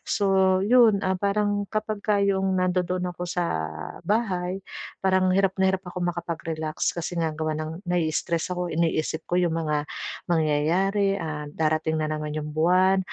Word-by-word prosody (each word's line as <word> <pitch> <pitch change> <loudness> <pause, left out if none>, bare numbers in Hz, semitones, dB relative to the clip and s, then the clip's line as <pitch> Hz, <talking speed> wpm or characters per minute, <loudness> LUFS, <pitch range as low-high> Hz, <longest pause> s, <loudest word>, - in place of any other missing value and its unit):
So, 200 - 0 0.4
'yon, 230 -3 +6
ah, 190 - +2
parang 205 +1 0
kapagka 215 -1 -1
'yong 195 -1 +1
nandoon 180 0 0
ako 175 - -7
sa 175 0 -1 0.6
bahay 190 -4 0 0.4
parang 185 -1 +2
hirap 190 0 +2
na 190 0 +4
hirap 190 0 -3
ako 180 0 -5
makapag-relax 165 -2 -2
kasi 170 +1 -4
nga 165 -1 +1
gawa 155 0 -2
ng 160 +4 -6
nai-istress 170 -1 0
ako 180 0 -2
iniisip 160 -1 0
ko 175 - +2
'yong 175 -2 +1
mga 150 -2 -1 0.4
mangyayari, 175 +5 +2
ah, 150 -2 -4
darating 155 +1 0
na 155 - -1
naman 150 0 -3
'yong 150 0 -4
buwan 185 +5 +3
180 Hz, 150 wpm, -25 LUFS, 160-190 Hz, 0.6 s, yon